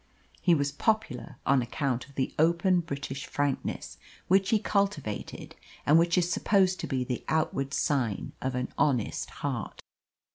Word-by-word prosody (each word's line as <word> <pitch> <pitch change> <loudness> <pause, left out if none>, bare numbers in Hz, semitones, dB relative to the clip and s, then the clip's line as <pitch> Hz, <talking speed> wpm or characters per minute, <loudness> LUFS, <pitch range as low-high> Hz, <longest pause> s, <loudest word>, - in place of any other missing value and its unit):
He 175 -2 +5
was 145 -1 0
popular 145 - -1
on 135 -1 +4
account 125 +1 -2
of 140 - -18
the 130 - -1
open 170 +3 +4
British 140 -4 -5
frankness 135 - -2 0.3
which 190 +1 +4
he 220 - +4
cultivated, 200 - -2 0.3
and 155 +3 +6
which 170 +1 +2
is 175 -1 +3
supposed 190 -2 +2
to - - -3
be 130 -2 0
the 125 -1 -3
outward 140 -3 0
sign 130 -8 0
of 130 -1 -2
an 125 0 -3
honest 125 -7 +1
heart. - - -4
145 Hz, 150 wpm, -29 LUFS, 130-175 Hz, 0.3 s, and